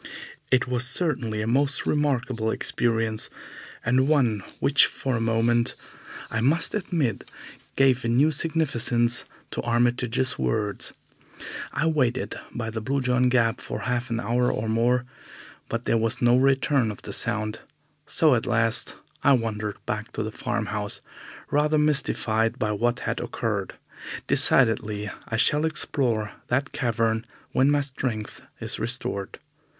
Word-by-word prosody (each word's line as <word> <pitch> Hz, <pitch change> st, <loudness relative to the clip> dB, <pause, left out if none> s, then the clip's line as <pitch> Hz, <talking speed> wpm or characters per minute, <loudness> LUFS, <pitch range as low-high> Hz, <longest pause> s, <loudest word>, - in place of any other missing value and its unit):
It 130 Hz, -1 st, +3 dB
was 125 Hz, -1 st, +1 dB
certainly 125 Hz, -8 st, 0 dB
a -, -, -3 dB
most 140 Hz, +4 st, +2 dB
remarkable 130 Hz, -6 st, 0 dB
experience, 115 Hz, -1 st, 0 dB, 0.6 s
and 130 Hz, +3 st, +3 dB
one 125 Hz, -9 st, +2 dB, 0.2 s
which 140 Hz, 0 st, +5 dB
for 130 Hz, -2 st, -3 dB
a 115 Hz, -, -1 dB
moment, 115 Hz, +1 st, +1 dB, 0.6 s
I 115 Hz, -, -1 dB
must 150 Hz, +7 st, +2 dB
admit, 165 Hz, -, -2 dB, 0.5 s
gave 130 Hz, -2 st, +3 dB
a -, -, -1 dB
new 135 Hz, +7 st, +3 dB
significance 125 Hz, -7 st, +1 dB, 0.3 s
to -, -, -2 dB
Armitage's 120 Hz, +1 st, +1 dB
words. 105 Hz, -2 st, -1 dB, 0.8 s
I -, -, -1 dB
waited 130 Hz, -6 st, +1 dB, 0.2 s
by 115 Hz, -1 st, -4 dB
the 110 Hz, 0 st, -4 dB
Blue 135 Hz, +5 st, -1 dB
John 125 Hz, 0 st, +2 dB
Gap 120 Hz, -1 st, +2 dB
for -, -, -5 dB
half 125 Hz, 0 st, -2 dB
an 115 Hz, 0 st, -1 dB
hour 120 Hz, +3 st, +1 dB
or 110 Hz, -, -3 dB
more, 120 Hz, +3 st, +2 dB, 0.6 s
but 115 Hz, +1 st, -2 dB
there 115 Hz, -, +2 dB
was 115 Hz, 0 st, 0 dB
no 120 Hz, 0 st, +4 dB
return 135 Hz, -1 st, +3 dB
of 105 Hz, -, -8 dB
the -, -, -6 dB
sound, 110 Hz, +1 st, -1 dB, 0.5 s
so 155 Hz, -4 st, +3 dB
at 120 Hz, -1 st, 0 dB
last 115 Hz, -1 st, +1 dB, 0.3 s
I 140 Hz, -, +6 dB
wandered 110 Hz, -4 st, -1 dB
back 105 Hz, +1 st, -4 dB
to -, -, -2 dB
the 110 Hz, -, -4 dB
farmhouse, 110 Hz, -5 st, -3 dB, 0.5 s
rather 150 Hz, +1 st, +2 dB
mystified 120 Hz, -6 st, +1 dB
by 110 Hz, -5 st, -1 dB
what 120 Hz, +3 st, 0 dB
had -, -, -2 dB
occurred. -, -, -3 dB, 0.5 s
Decidedly 105 Hz, -4 st, +3 dB, 0.2 s
I 110 Hz, -, -2 dB
shall 150 Hz, +6 st, +3 dB
explore 125 Hz, -8 st, -1 dB, 0.2 s
that 135 Hz, +4 st, 0 dB
cavern 115 Hz, -2 st, 0 dB, 0.3 s
when 135 Hz, +2 st, +3 dB
my 145 Hz, 0 st, +3 dB
strength 130 Hz, -6 st, -4 dB, 0.2 s
is -, -, -2 dB
restored. 110 Hz, -3 st, -2 dB
120 Hz, 140 wpm, -25 LUFS, 110-135 Hz, 0.8 s, I